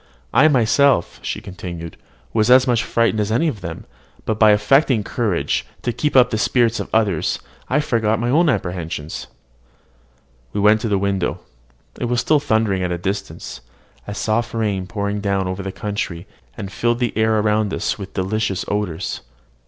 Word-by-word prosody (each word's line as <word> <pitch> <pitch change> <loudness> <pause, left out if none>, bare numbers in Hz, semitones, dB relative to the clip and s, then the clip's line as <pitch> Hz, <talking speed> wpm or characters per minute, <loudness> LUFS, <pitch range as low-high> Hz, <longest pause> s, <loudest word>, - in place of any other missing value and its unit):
"I 135 +6 +6
myself," 130 - +3
she - - -4
continued, 85 -3 -7 0.4
"was 110 0 +2
as 130 0 +7
much 120 -3 +2
frightened 115 -2 +1
as 105 0 0
any 150 +9 +2
of 110 -10 -3
them; 85 -2 -7 0.4
but 110 -1 -1
by 110 - +7
affecting 105 +3 +4
courage, 95 - -1 0.2
to 120 - -1
keep 150 +2 -1
up 125 -1 +6
the 110 - 0
spirits 120 -1 +2
of - - -4
the - - +3
others, 100 -8 0 0.3
I 135 - +2
forgot 110 -6 +1
my 120 +1 0
apprehensions." 90 - -1 1.3
We - - -1
went 105 +1 +4
to 115 - -1
the 100 - +2
window. 95 -2 -1 0.6
It - - -1
was 120 0 0
still 150 +4 +3
thundering 110 -7 +1
at 90 -1 -1
a 85 - -1
distance: 100 +3 -5 0.5
a 105 - -5
soft 115 +3 -1
rain 105 -4 -1
was - - -15
pouring 100 +2 -2
down 100 -2 0
over 95 +1 -3
the 95 0 -4
country, 95 -4 -4 0.3
and 100 -1 -6
filled 120 +2 0
the 120 -2 -1
air 110 0 +2
around 105 -1 +1
us - - -2
with 95 -1 -8
delicious 95 +1 -1
odours. 100 -4 -2
105 Hz, 175 wpm, -20 LUFS, 95-120 Hz, 1.3 s, as